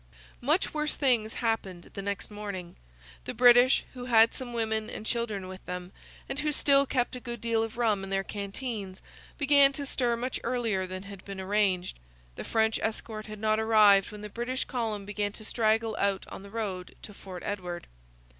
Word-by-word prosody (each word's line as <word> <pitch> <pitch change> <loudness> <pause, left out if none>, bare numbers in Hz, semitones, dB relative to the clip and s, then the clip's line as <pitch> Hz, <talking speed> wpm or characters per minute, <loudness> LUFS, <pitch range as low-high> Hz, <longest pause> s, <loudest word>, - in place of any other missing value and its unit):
Much 305 +9 +1
worse 300 0 0
things 235 -6 +2
happened 190 -6 -2
the 195 - -5
next 200 +1 -4
morning. 200 -4 -6 0.5
The - - -4
British, 245 +2 +7
who 250 -1 -7
had 230 -2 +6
some 255 -2 -6
women 220 -2 -1
and 215 - -7
children 220 -5 -2
with 185 0 -9
them, 180 0 -5 0.4
and 270 - -4
who 300 0 0
still 280 -1 +4
kept 250 -1 0
a - - -5
good 240 -1 -6
deal 230 0 +1
of 225 0 -4
rum 215 -5 +2
in 195 - -6
their 195 0 0
canteens, 200 -1 -5 0.4
began 280 -1 +6
to 280 +1 -4
stir 245 -3 0
much 250 +2 -2
earlier 230 -6 0
than 185 +1 -6
had 200 -1 -10
been 195 -1 -7
arranged. 190 - 0 0.4
The - - -6
French 220 -1 +1
escort 220 -1 -3
had 215 0 -7
not 215 +1 +1
arrived 210 -3 +5
when 210 0 -9
the 210 - -5
British 240 +4 -2
column 220 -5 -2
began 205 0 -2
to 215 - -9
straggle 220 0 +1
out 200 -1 +1
on - - -8
the 200 - -11
road 195 -4 -4
to 210 - -8
Fort 185 -2 -9
Edward. 180 -4 -4
220 Hz, 190 wpm, -29 LUFS, 200-240 Hz, 0.5 s, British